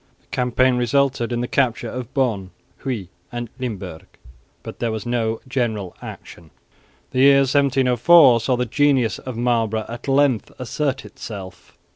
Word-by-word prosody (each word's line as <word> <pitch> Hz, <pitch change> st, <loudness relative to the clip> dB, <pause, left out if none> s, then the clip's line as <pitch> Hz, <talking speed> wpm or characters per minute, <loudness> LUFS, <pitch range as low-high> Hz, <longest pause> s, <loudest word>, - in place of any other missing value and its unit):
The -, -, -34 dB
campaign 125 Hz, 0 st, +2 dB
resulted 125 Hz, 0 st, +1 dB
in 120 Hz, 0 st, -1 dB
the 120 Hz, -, -2 dB
capture 120 Hz, -3 st, 0 dB
of 125 Hz, +1 st, -6 dB
Bonn, 110 Hz, -9 st, 0 dB, 0.3 s
Huy 115 Hz, -10 st, -4 dB, 0.2 s
and 120 Hz, -1 st, -5 dB
Limburg, 100 Hz, -10 st, -6 dB, 0.6 s
but -, -, -9 dB
there 115 Hz, -, -1 dB
was 110 Hz, -2 st, -4 dB
no 115 Hz, -2 st, -1 dB
general 110 Hz, -8 st, -2 dB
action. 85 Hz, -2 st, -10 dB, 0.6 s
The 130 Hz, -, -1 dB
year 140 Hz, +1 st, +7 dB
1704 135 Hz, 0 st, +5 dB
saw 125 Hz, +3 st, 0 dB
the 125 Hz, -, 0 dB
genius 135 Hz, -1 st, +2 dB
of 130 Hz, -3 st, -7 dB
Marlborough 115 Hz, -2 st, 0 dB
at 120 Hz, +3 st, -8 dB
length 135 Hz, -4 st, +2 dB
assert 135 Hz, +2 st, -2 dB
itself. 95 Hz, -4 st, -10 dB
120 Hz, 145 wpm, -21 LUFS, 110-130 Hz, 0.6 s, year